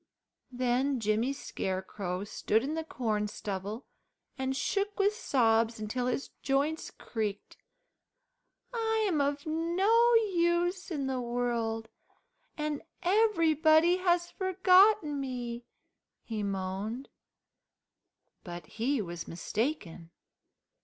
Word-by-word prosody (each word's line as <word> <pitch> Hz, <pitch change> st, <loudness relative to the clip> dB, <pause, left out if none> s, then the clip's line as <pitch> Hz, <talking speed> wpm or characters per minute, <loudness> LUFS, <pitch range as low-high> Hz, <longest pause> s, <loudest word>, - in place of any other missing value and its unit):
Then 255 Hz, +2 st, +1 dB
Jimmy 220 Hz, +4 st, +1 dB
Scarecrow 190 Hz, -6 st, -4 dB
stood 215 Hz, +2 st, 0 dB
in 290 Hz, +3 st, -2 dB
the 320 Hz, 0 st, -2 dB
corn 220 Hz, -8 st, -1 dB
stubble 205 Hz, +3 st, -5 dB, 0.5 s
and 265 Hz, 0 st, -2 dB
shook 400 Hz, +5 st, -1 dB
with 405 Hz, +1 st, +4 dB
sobs 230 Hz, -, +2 dB
until 245 Hz, +4 st, -2 dB
his 255 Hz, +2 st, -2 dB
joints 285 Hz, +4 st, 0 dB
creaked. 210 Hz, -3 st, -5 dB, 1.2 s
"I 445 Hz, -2 st, +1 dB
am 320 Hz, -7 st, +1 dB
of 285 Hz, 0 st, -1 dB
no 380 Hz, +9 st, +3 dB
use 355 Hz, -3 st, +2 dB
in 295 Hz, -6 st, -2 dB
the 260 Hz, -1 st, -1 dB
world, 235 Hz, -2 st, -1 dB, 0.7 s
and 300 Hz, -1 st, -2 dB, 0.2 s
everybody 335 Hz, -4 st, +4 dB
has 350 Hz, -1 st, +1 dB
forgotten 375 Hz, -3 st, +4 dB
me," 245 Hz, -2 st, -4 dB, 0.6 s
he 220 Hz, -2 st, -4 dB
moaned. 200 Hz, +5 st, -3 dB, 1.3 s
But 175 Hz, -2 st, -7 dB
he 235 Hz, -, -1 dB
was 170 Hz, -2 st, -6 dB
mistaken. 180 Hz, -, -3 dB
265 Hz, 100 wpm, -30 LUFS, 220-345 Hz, 1.3 s, with